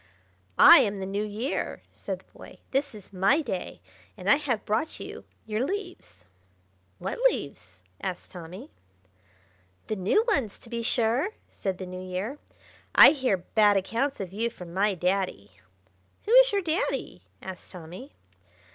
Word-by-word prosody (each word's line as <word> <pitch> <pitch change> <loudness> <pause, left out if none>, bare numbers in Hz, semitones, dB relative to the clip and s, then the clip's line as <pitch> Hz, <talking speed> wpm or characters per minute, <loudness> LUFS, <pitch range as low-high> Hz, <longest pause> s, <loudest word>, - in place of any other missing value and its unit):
"I - - +10
am 200 -1 0
the 190 - -4
New 200 +2 -2
Year!" 215 +7 -3
said - - -5
the - - -35
boy. - - -12
"This 275 -2 -1
is 205 -1 -14
my 195 - +3
day, 190 -9 -5 0.4
and - - +1
I 280 - +6
have 260 -7 -2
brought 225 +10 -1
you - - -8 0.2
your 215 +2 -1
leaves." 355 - -6 0.7
"What - - -5
leaves?" 90 - -8 0.2
asked 185 -2 -5
Tommy. 180 - -10 1.1
"The 215 - -2
new 205 - +2
ones, 275 - 0
to 230 - -16
be 235 0 -2
sure!" 245 - +1 0.2
said 190 -2 -3
the 185 - -6
New 185 0 -7
Year. 185 +10 -4 0.6
"I - - +10
hear 260 -9 +1
bad 205 +3 +3
accounts 235 +8 -1
of 190 -2 -6
you 230 +3 -1
from 180 -7 -11
my 200 +2 +2
Daddy—" 180 - -1 0.7
"Who 430 - -2
is - - +8
your 400 -2 0
Daddy?" 330 +3 -2 0.2
asked 190 -1 -9
Tommy. 180 - -10
210 Hz, 155 wpm, -27 LUFS, 185-275 Hz, 1.1 s, I